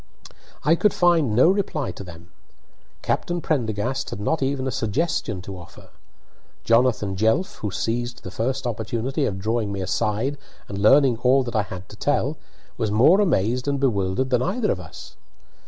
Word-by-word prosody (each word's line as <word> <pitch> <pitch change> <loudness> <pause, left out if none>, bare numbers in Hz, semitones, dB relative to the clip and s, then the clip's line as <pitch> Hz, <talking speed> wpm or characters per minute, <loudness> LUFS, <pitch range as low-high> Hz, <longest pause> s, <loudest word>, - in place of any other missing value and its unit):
I 150 - +4
could 205 +5 +2
find 170 - +3
no 130 +9 +6
reply 185 -8 -1
to - - -9
them. 85 0 -12 0.7
Captain 175 0 -1
Prendergast 130 -3 -1
had - - -6
not 160 +10 -1
even 135 0 -1
a 130 - -1
suggestion 115 - -1
to 100 0 -7
offer. 85 -1 -13 0.7
Jonathan 115 -4 +2
Jelf, 110 - +1
who 105 - -2
seized 120 +5 -3
the 95 - -7
first 130 +7 -2
opportunity 120 +5 -2
of 95 - -2
drawing 110 +1 -1
me 100 - -4
aside 110 +8 -1 0.3
and 100 - -5
learning 130 +3 +5
all 130 +2 +4
that 120 -2 -6
I 110 - +3
had 95 -2 -8
to - - -11
tell, 145 +4 0 0.4
was 110 -3 -1
more 130 - +5
amazed 125 - +1
and 140 -1 0
bewildered 120 0 0
than 125 -1 +3
either 210 - 0
of 90 - -2
us. 90 - -11
120 Hz, 170 wpm, -23 LUFS, 105-140 Hz, 0.7 s, no